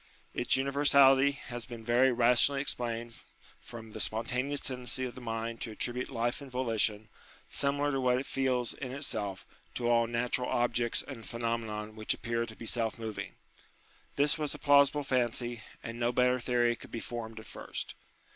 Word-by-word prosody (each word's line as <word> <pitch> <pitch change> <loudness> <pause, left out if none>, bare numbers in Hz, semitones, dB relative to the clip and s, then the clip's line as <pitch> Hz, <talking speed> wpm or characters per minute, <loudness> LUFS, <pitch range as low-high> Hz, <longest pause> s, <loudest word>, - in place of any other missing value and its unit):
Its 120 0 +3
universality 140 0 +5
has 120 -4 -6
been 120 -3 -8
very 120 +3 +4
rationally 125 +3 +4
explained 120 -4 -3 0.4
from 115 -2 -10
the - - -7
spontaneous 125 +6 0
tendency 125 0 -3
of 125 - -5
the 130 - -10
mind 115 0 -4
to - - -2
attribute 120 +3 -2
life 120 +4 -1
and 140 - -9
volition, 115 -4 +1 0.4
similar 145 +1 0
to 135 -1 0
what 125 -1 +3
it 130 - -3
feels 130 -3 0
in 130 -2 -6
itself, 105 -8 -2 0.3
to 120 - -1
all 115 -1 +4
natural 120 +2 0
objects 120 -1 +1
and 115 -7 -8
phenomena 115 -1 -3
which 110 0 -1
appear 115 0 -2
to 110 - -9
be 115 - -9
self 115 -1 0
moving. 110 -2 -5 0.8
This 145 +2 +3
was 150 -2 -1
a - - -7
plausible 145 0 +5
fancy, 120 -3 -1 0.2
and 115 +1 -6
no 120 0 +2
better 125 0 +3
theory 120 -1 +2
could - - -13
be 115 - -4
formed 115 -1 -6
at 110 - -11
first. - - -6
120 Hz, 170 wpm, -31 LUFS, 115-130 Hz, 0.8 s, universality